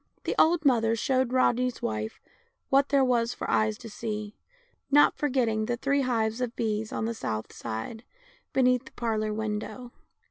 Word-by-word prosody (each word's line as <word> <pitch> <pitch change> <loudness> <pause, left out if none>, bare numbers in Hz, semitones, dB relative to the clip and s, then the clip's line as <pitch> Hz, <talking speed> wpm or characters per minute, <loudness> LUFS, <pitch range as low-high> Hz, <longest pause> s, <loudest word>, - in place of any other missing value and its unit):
The - - -1
old 325 -1 +4
mother 230 -4 +3
showed 260 +2 +1
Rodney's 250 -1 +2
wife 110 0 -3 0.5
what 275 +1 +4
there 275 -2 +4
was 235 -2 +1
for - - -5
eyes 215 -1 +2
to 230 - -10
see, 215 -1 -5 0.5
not 290 +1 +5
forgetting 235 -6 0
the 240 - -1
three 280 +3 +1
hives 230 -2 0
of 245 -1 -2
bees 220 -1 -2
on 220 - -2
the 230 - -1
south 110 - -4
side, 115 - -6 0.5
beneath 250 -1 +3
the - - -13
parlor 215 -2 -1
window. 220 +3 -4
230 Hz, 165 wpm, -28 LUFS, 215-255 Hz, 0.5 s, not